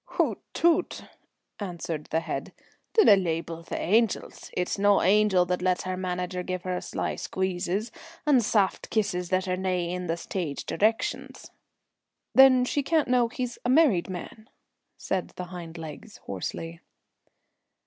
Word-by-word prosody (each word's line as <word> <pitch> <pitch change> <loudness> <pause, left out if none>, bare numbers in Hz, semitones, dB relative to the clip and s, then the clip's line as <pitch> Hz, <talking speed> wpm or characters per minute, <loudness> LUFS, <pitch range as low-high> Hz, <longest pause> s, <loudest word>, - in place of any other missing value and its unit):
"Hoot - - +1 0.2
toot!" 340 +1 +2 0.6
answered 170 -5 -4
the 160 - 0
head. - - -5 0.4
"Dinna 430 - +7
leebel 165 -2 -2
the 165 - -5
angels. 220 +3 0
It's 180 +2 -2
no 205 0 +5
an - - +1
angel 200 -2 +4
that 180 0 -1
lets 185 0 +1
her 185 0 -3
manager 180 0 -3
give 185 0 -4
her 180 -1 -2
sly - - -3
squeezes 190 +3 -2 0.3
and 275 -5 +4
saft 205 -3 +1
kisses 180 -5 -1
that 185 0 +1
are 185 - +1
nae 185 -2 -1
in 180 0 -4
the 165 +1 -1
stage 170 -4 -4
directions." 220 +2 -1 0.8
"Then 260 -2 +7
she 285 - 0
can't 310 -1 +1
know 245 -1 +4
he's 250 +1 -5
a 245 - -1
married 255 - +4
man," 190 +4 -8 0.5
said 185 -2 -3
the 180 - -5
hind 170 -1 -8
legs 160 +6 -9
hoarsely. 165 - -5
185 Hz, 150 wpm, -27 LUFS, 175-220 Hz, 0.8 s, Dinna